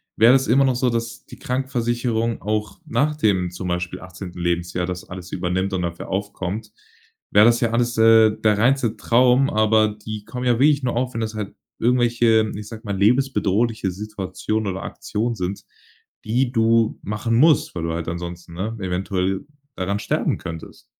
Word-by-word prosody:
wäre 115 +3 +6
das 135 0 +3
immer 135 +4 +4
noch 130 -2 +2
so, 125 0 +1
dass 115 0 -4
die - - -12
Krankenversicherung 120 -3 -1
auch 105 0 -3
nach 150 0 0
dem 95 - +1
zum 90 +1 -6
Beispiel 90 +1 -3
18. 90 -1 -9
Lebensjahr 85 +1 -1
das 90 0 -5
alles 90 -1 -9
übernimmt 95 +2 -1
und 90 -1 -1
dafür 85 0 -5
aufkommt, 100 +1 -4 0.6
wäre 105 - +6
das 120 0 +4
ja 115 - +2
alles, 120 +1 0
äh, 110 -1 +7
der 110 -1 +2
reinste 120 0 +2
Traum, 125 +3 +3
aber 110 0 +3
die 105 0 -7
kommen 125 0 -4
ja 120 - +5
wirklich 145 +2 +4
nur 125 -3 -1
auf, 125 +1 -1
wenn 115 - -3
das 110 0 -3
halt 105 -2 -5 0.2
irgendwelche, 120 -2 +2
ich 105 0 -7
sage 110 -1 -9
mal, 100 -2 -2
lebensbedrohliche 110 -2 +1
Situationen 105 +1 -3
oder 95 - -6
Aktionen 115 +3 -3
sind, 95 0 -4 0.6
die 120 +3 +1
du 115 -2 +2
machen 105 +3 -1
musst, 150 +2 +4
weil 85 - -3
du 85 0 -2
halt 85 0 -4
ansonsten, 85 0 -6
ne, 105 +6 -3
eventuell 95 +1 -2 0.3
daran 100 +2 -2
sterben - - -1
könntest. 80 0 -9
110 Hz, 175 wpm, -22 LUFS, 95-120 Hz, 0.6 s, äh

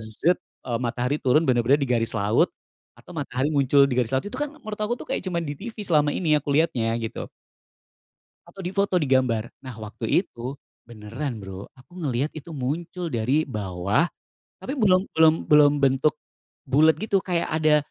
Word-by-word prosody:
zet 110 +11 +1 0.4
matahari 125 +3 -1
turun 150 +4 +3
bener-bener 125 0 +3
di 140 - +1
garis 115 -2 +1
laut 105 +1 +3 0.5
atau - - -14
matahari 140 -1 -1
muncul 140 -1 +4
di 135 - -1
garis 120 - -1
laut. 130 - -1
Itu 205 +5 -6
kan 295 - 0
menurut 215 -7 -8
aku 215 +3 0
tuh - - -10
kayak - - 0
cuman 170 -2 -2
di 145 - -4
TV 230 +1 -8
selama 150 -5 +3
ini 160 -4 +1
aku 145 - -11
lihatnya 120 -8 +1
gitu. 115 -1 -5 1.2
Atau 195 - -11
di 180 - -2
foto 200 -2 +2
di 160 - +1
gambar. 125 -4 +1
Nah, 130 -3 -8
waktu 110 +1 -6 0.2
itu 125 +1 -7 0.3
beneran 115 +4 -6
Bro, 95 -1 -8
aku 125 +5 -20
ngelihat 140 0 -1
itu 155 +1 -9
muncul 165 +6 -3
dari 130 +8 +1
bawah 100 - -1 0.5
tapi 270 - -3
belum 185 -3 +4
belum 160 -1 +5
belum 150 -1 +6
bentuk 135 +3 +3 0.5
bulet 150 +4 +4
gitu, 205 -2 +1
kayak 175 -2 -1
ada 155 -1 +3
140 Hz, 175 wpm, -24 LUFS, 120-165 Hz, 1.2 s, belum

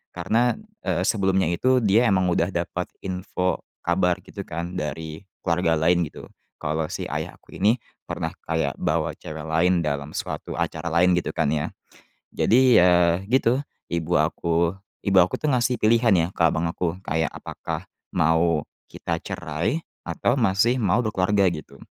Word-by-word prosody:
Karena, 120 +2 +2 0.3
eee, - - 0
sebelumnya 95 -4 +2
itu 130 +9 +3
dia 110 +4 +4
emang 95 -2 +2
udah - - +1
dapat - - -3 0.2
info, 90 0 -2 0.2
kabar, 90 +1 +2
gitu, 100 - -7
kan, 85 +2 -4
dari 80 0 -4 0.2
keluarga 85 -1 +2
lain, 85 +3 +3
gitu, - - -11 0.4
kalau 75 +1 -1
si - - -4
ayah - - -4
aku - - -14
ini 110 +5 +4 0.3
pernah - - -3
kayak 80 -3 0
bawa - - 0
cewek 80 0 -7
lain 85 +2 +2
dalam 70 0 -2
suatu - - -4
acara 85 - -2
lain, 90 +2 +4
gitu, 85 - -1
kan, 75 -3 +1
ya. 75 -1 -1 0.7
Jadi, 125 +1 +4
ya, 90 -1 +4
gitu, 130 +1 +3 0.3
ibu 85 +1 -1
aku 85 +2 +1 0.3
ibu 100 -1 +1
aku, 90 - 0
tuh, 155 - 0
ngasih 125 -1 +1
pilihan, 115 0 +4
ya, 85 -2 +3
ke - - 0
abang 80 0 +2
aku 85 0 -1
kayak 80 0 0
apakah - - -6 0.3
mau 80 0 +2 0.3
kita - - -3
cerai 85 - -2 0.2
atau 125 - 0
masih 115 +2 +3
mau 105 -1 +2
berkeluarga, 100 -1 +2
gitu. 75 -3 -9
90 Hz, 155 wpm, -24 LUFS, 80-105 Hz, 0.7 s, dia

